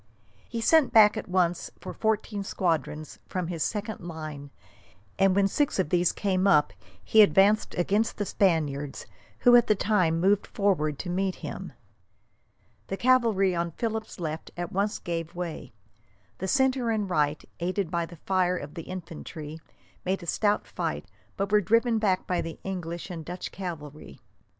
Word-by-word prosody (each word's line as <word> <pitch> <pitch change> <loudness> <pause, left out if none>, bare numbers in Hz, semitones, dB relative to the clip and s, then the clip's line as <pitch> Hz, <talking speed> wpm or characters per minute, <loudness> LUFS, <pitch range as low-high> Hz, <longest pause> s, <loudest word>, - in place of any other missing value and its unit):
He 230 -1 -3
sent 315 +4 +4
back 215 -1 +7
at 220 - -5
once 180 -2 +1
for - - -7
fourteen 215 -2 -1
squadrons 160 -5 -2
from 185 -2 -2
his 170 -3 -4
second 210 +3 -2
line, 155 -4 -7 0.7
and 195 -1 +4
when 200 0 +4
six 290 +8 0
of 185 -6 0
these 175 +1 +3
came 195 -1 0
up 150 - +4 0.3
he 220 - +6
advanced 205 +1 +4
against 205 +5 +1
the 205 - -1
Spaniards, 150 -8 0 0.4
who 245 0 +7
at 240 - +6
the 215 - +4
same - - -16
time 185 -6 +2
moved 195 +3 +2
forward 160 -8 0
to 175 - -5
meet 190 +1 0
him. - - -6 1.1
The 195 - -3
cavalry 230 -7 +3
on 170 -1 -2
Philip's 220 -1 -4
left 160 -1 -4
at 175 -1 -4
once 200 +2 0
gave 165 -1 -4
way. 175 -2 -5 0.7
The 190 - -3
centre 265 0 +2
and 215 -3 0
right, 150 -4 0
aided 180 0 -1
by 170 -1 -1
the 170 - -11
fire 180 +1 +1
of 145 -2 -7
the 165 - -6
infantry, 165 -3 -7 0.4
made 190 0 -1
a - - -7
stout 205 +4 +1
fight, - - -3 0.3
but 195 0 -2
were 210 0 +5
driven 230 +4 +2
back 190 -4 +1
by 180 -1 0
the 165 - -6
English 175 -1 -5
and 165 -2 -6
Dutch 180 +3 -6
cavalry. 155 -6 -7
185 Hz, 165 wpm, -27 LUFS, 165-210 Hz, 1.1 s, back